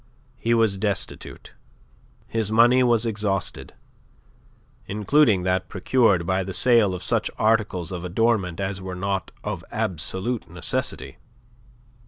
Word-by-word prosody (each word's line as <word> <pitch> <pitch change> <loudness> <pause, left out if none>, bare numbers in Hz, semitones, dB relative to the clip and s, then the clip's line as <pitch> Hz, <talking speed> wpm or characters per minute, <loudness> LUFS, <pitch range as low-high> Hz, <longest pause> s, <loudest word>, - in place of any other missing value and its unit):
He 115 +1 +1
was 110 -4 +1
destitute. 100 -1 -4 0.7
His 110 -2 -2
money 120 +3 +5
was 120 -2 +3
exhausted, 105 -3 -3 1.1
including 105 -1 +2
that 95 0 -1
procured 100 -2 +2
by 95 +2 0
the 95 0 -5
sale 115 -6 +4
of 90 - -7
such - - 0
articles 105 -6 0
of 90 -2 -5
adornment 95 -1 0
as 95 -1 -3
were 95 -1 -6
not 95 +1 -3
of - - -4
absolute 95 +7 -3
necessity. 65 0 -2
100 Hz, 120 wpm, -23 LUFS, 95-115 Hz, 1.1 s, money